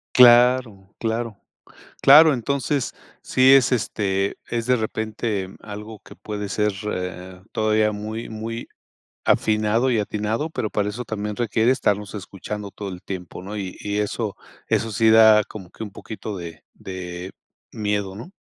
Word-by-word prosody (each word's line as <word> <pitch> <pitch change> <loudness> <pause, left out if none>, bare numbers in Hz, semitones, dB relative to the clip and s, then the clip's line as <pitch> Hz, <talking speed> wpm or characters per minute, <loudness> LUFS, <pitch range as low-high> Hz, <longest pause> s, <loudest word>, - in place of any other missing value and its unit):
Claro, 120 -5 +5
claro. 115 -2 -2 0.6
Claro, 150 +2 +8
entonces 135 +2 -1 0.3
sí 130 +1 +5
es, 135 -1 +5
este, 100 -4 0
es 115 -1 -2
de 125 - +3
repente 110 -3 -2
algo 105 0 -8
que - - -15
puede 105 -2 -5
ser 105 +1 +1
e 90 -1 -5
eh, - - -19
todavía 110 0 +2
muy, 110 +2 -5
muy 115 +1 -5 0.6
afinado 110 +4 +2
y 115 - +2
atinado, 105 +8 -2
pero 110 -8 -3
para 105 -1 0
eso 120 +3 -5
también 105 -1 -4
requiere 115 0 +1
estarnos 105 -5 0
escuchando 100 +1 -6
todo 100 -2 -6
el 90 -1 -9
tiempo, 90 -1 -7
¿no?, 105 +2 -6
y 95 -2 -5
y 105 0 -3
eso 105 0 -2 0.3
eso 115 - 0
sí 110 +2 +4
da 110 -1 +7
como 95 -4 -10
que 110 - -8
un 105 - -7
poquito 110 0 -7
de 85 -3 -8
de 90 0 -7 0.4
miedo, 105 -2 -2
¿no? 135 - -9
105 Hz, 155 wpm, -23 LUFS, 100-115 Hz, 0.6 s, Claro